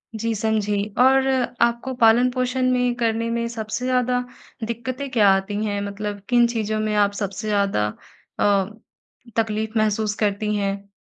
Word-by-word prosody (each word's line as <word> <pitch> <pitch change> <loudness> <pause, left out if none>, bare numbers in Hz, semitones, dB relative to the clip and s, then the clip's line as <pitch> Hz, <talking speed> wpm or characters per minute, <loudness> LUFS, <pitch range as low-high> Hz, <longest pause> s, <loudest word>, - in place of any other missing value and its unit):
जी, 225 +1 -1
समझी 215 -1 0 0.2
और 265 +1 +5 0.3
आपको 235 +2 +1
पालन-पोषण 250 +2 +3
में 250 -1 +1
करने 230 -1 0
में 235 0 -1
सबसे 225 +1 -4
ज़्यादा 250 -1 +1 0.5
दिक्कतें 255 +4 -4
क्या 215 -5 +5
आती 195 +2 0
हैं? 205 -1 -1
मतलब 205 0 -5
किन 240 -1 +5
चीज़ों 220 -2 -2
में 215 0 -1
आप 205 -1 +3
सबसे 200 +1 -4
ज़्यादा 200 - +1 0.5
अ, 200 -2 +3 0.7
तकलीफ़ 220 0 -1
महसूस 215 0 +1
करती 210 0 0
हैं? 200 0 -3
220 Hz, 140 wpm, -22 LUFS, 205-240 Hz, 0.7 s, और